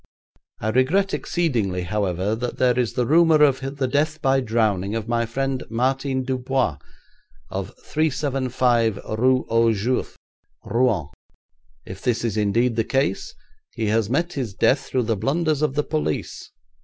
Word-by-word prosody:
I 110 - -2
regret 145 - +2
exceedingly, 115 - -1
however, 95 +1 -1
that 120 +2 -4
there 125 -1 +2
is 120 -3 0
the 125 - 0
rumour 160 +2 +5
of 140 -3 +4 0.2
the 135 -2 0
death 150 +4 0
by 135 -2 +2
drowning 110 -4 0
of 115 -1 -3
my 115 0 0
friend 135 +2 -2
Martin 130 +3 0
Dubois, 130 - -1 0.7
of - - -5
375 130 -7 0 0.2
Rue 130 +1 +3
aux 115 0 +3
Juifs, 115 +4 -1 0.5
Rouen. 115 - +1 0.8
If 95 +1 -9
this 120 -2 0
is 115 -3 -1
indeed 115 +3 +1
the 115 - +3
case 135 - -1 0.4
he 115 - -2
has 110 -1 +1
met 170 +7 0
his 120 -8 -4
death 135 - +3
through 130 - 0
the 115 0 0
blunders 150 - 0
of 150 -3 0
the 150 - +1
police. 75 - -3
125 Hz, 150 wpm, -23 LUFS, 110-135 Hz, 0.8 s, rumour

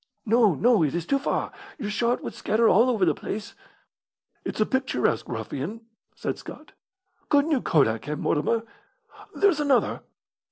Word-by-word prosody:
"No, 225 -5 +4
no; 235 - +3
it 155 0 +1
is 170 -1 -2
too 275 +6 +1
far. 275 - -2 0.3
Your 210 - -4
shot 235 +3 0
would - - -5
scatter 225 +2 +1
all 230 +6 +5
over 220 -7 +2
the 160 - +3
place." 205 +7 -6 0.9
"It's - - -5
a 215 - +4
picturesque 255 - 0
ruffian," 135 - -5 0.3
said - - -4
Scott. - - -11 0.6
"Couldn't 290 +1 +3
you 275 -5 +2
kodak 115 -7 +2
him, 150 0 -4
Mortimer? 225 +9 0 0.7
There's 390 -7 +3
another!" 285 -4 +1
220 Hz, 155 wpm, -25 LUFS, 155-250 Hz, 0.9 s, all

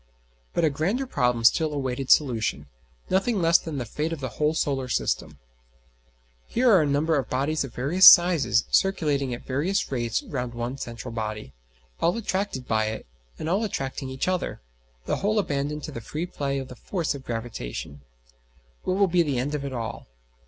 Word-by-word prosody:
But 165 - +2
a 155 - +2
grander 190 - -1
problem 125 - 0
still 155 +7 +4
awaited 135 -2 -3
solution 115 - +2 0.5
nothing 195 +3 +2
less 165 -1 +5
than 160 -3 -6
the 125 - -3
fate 150 +8 -3
of 165 - -4
the 130 -2 -4
whole 150 +7 0
solar 135 -4 -1
system. 105 - -1 1.1
Here 245 0 +3
are 190 -5 +6
a 150 - +1
number 145 +2 +2
of 130 - -5
bodies 140 +4 0
of 135 - -9
various 155 +9 +5
sizes 175 - +7
circulating 150 -9 +1
at 120 - -6
various 150 +9 -1
rates 120 -3 -1
round 125 -3 -4
one 120 +3 -4
central 120 0 -6
body, 110 -2 -5 0.5
all 175 +6 +2
attracted 195 - -2
by 110 -1 +1
it, 110 0 -4 0.3
and - - -5
all 195 +6 +1
attracting 135 -8 -3
each 130 +4 -3
other, 185 -1 -1 0.5
the - - 0
whole 210 +2 0
abandoned 150 -5 -1
to - - -5
the 115 - -6
free 155 +9 -4
play 140 -6 -3
of 135 -1 -4
the 125 - -10
force 170 - -2
of 140 -2 -8
gravitation: 70 - -5 0.8
what 185 - -1
will 200 - +5
be 175 0 +3
the 145 -6 0
end 135 +4 -1
of 145 -2 -2
it 140 - -4
all? 115 -5 -5
140 Hz, 185 wpm, -25 LUFS, 125-170 Hz, 1.1 s, sizes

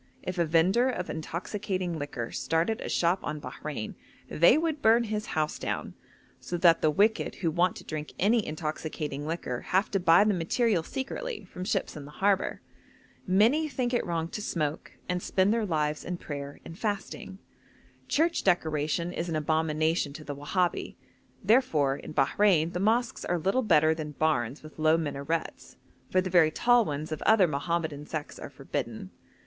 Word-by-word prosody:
If 180 -1 -4
a 170 - +3
vendor 180 +10 +3
of 185 -8 -3
intoxicating 185 +2 -3
liquor 135 -5 -5
started 165 +7 0
a - - -5
shop 175 +2 +2
on 150 - -4
Bahrein, 145 -6 -6 0.3
they 170 - +5
would 315 -2 -1
burn 230 +2 +5
his 215 -1 -3
house 155 -1 0
down, - - -3 0.5
so 175 - -4
that 170 -1 +5
the 155 - +4
wicked 205 +9 +2
who 165 -4 -1
want 175 +2 +2
to - - -9
drink 155 -1 -6
any 220 +3 +3
intoxicating 150 -2 -4
liquor 155 -7 -3
have 190 +4 0
to 195 - +1
buy 175 +1 +6
the 210 0 +2
material 185 +3 +1
secretly 420 - -5
from 180 - -8
ships - - -1
in 145 -2 -8
the 145 - -12
harbour. 195 -1 +1 0.7
Many 230 +12 +3
think 250 -2 -2
it 240 - +2
wrong 165 -2 -2
to 210 - -5
smoke, 155 -6 -3
and 180 0 -1
spend 190 +4 +2
their 225 -2 0
lives 150 -3 -1
in 180 0 -4
prayer 140 -3 -7
and 165 - -9
fasting. 205 -2 -4 0.7
Church 335 +3 +1
decoration 170 -1 0
is 170 +1 -3
an 165 - -2
abomination 155 0 0
to 155 - -9
the 145 -1 -6
Wahabi; 175 +5 -1 0.5
therefore, 185 - +3
in 150 - -9
Bahrein 165 +3 +3
the 180 - -2
mosques 230 +4 +1
are 175 - 0
little 195 +10 +1
better 160 -8 +4
than 155 -2 -6
barns 140 -3 0
with 155 0 -13
low 155 +1 +4
minarets, 160 +1 -4 0.3
for 185 - +3
the 185 -1 -4
very 170 -3 +6
tall 240 +7 +3
ones 150 +1 -4
of 155 - -4
other 215 -5 +5
Mohammedan 155 0 -2
sects 155 -2 -5
are - - -7
forbidden. - - -5
170 Hz, 175 wpm, -28 LUFS, 155-205 Hz, 0.7 s, buy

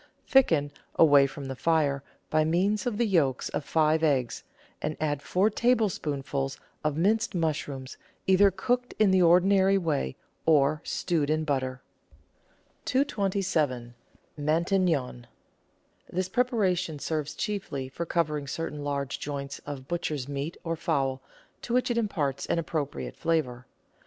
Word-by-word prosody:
Thicken, 160 - +3 0.2
away 145 -3 +6
from 140 +1 -8
the 135 0 -5
fire, 145 -2 +1 0.3
by 155 0 +3
means 190 +7 +1
of 225 -4 -1
the 235 - +2
yolks 155 - +1
of - - -3
five 155 +1 +2
eggs, 135 -6 +1 0.4
and 155 0 -3
add 145 -2 -1
four 185 +8 +2
tablespoonfuls 150 - 0 0.3
of 150 -1 0
minced 215 +5 +1
mush 160 -3 0
rooms, 135 -2 -7 0.3
either 190 +1 +6
cooked 245 +6 -1
in 215 -3 +4
the 190 -1 +4
ordinary 190 +3 +5
way 155 - -1 0.3
or 150 -1 +4
stewed 160 -5 -1
in 155 0 +1
butter. 130 -3 -2 1.0
227— 185 - 0 0.5
MATIQNON 160 -5 +1 0.9
This 185 +1 -1
preparation 190 - +1
serves 150 0 -3
chiefly 155 -11 -3
for 135 +6 -5
covering 150 -4 0
certain 150 0 -4
large 140 -1 -2
joints 140 -1 -5
of 135 -2 -6
butcher's 155 -6 -2
meat, 140 +3 -4
or 165 -1 -2
fowl, 135 -6 -1 0.4
to 240 - -2
which 255 0 +2
it 235 - 0
imparts 155 - -1
an - - +1
appro 155 -3 -1
priate - - -7
flavour. 130 -7 -1
155 Hz, 135 wpm, -28 LUFS, 140-190 Hz, 1.0 s, away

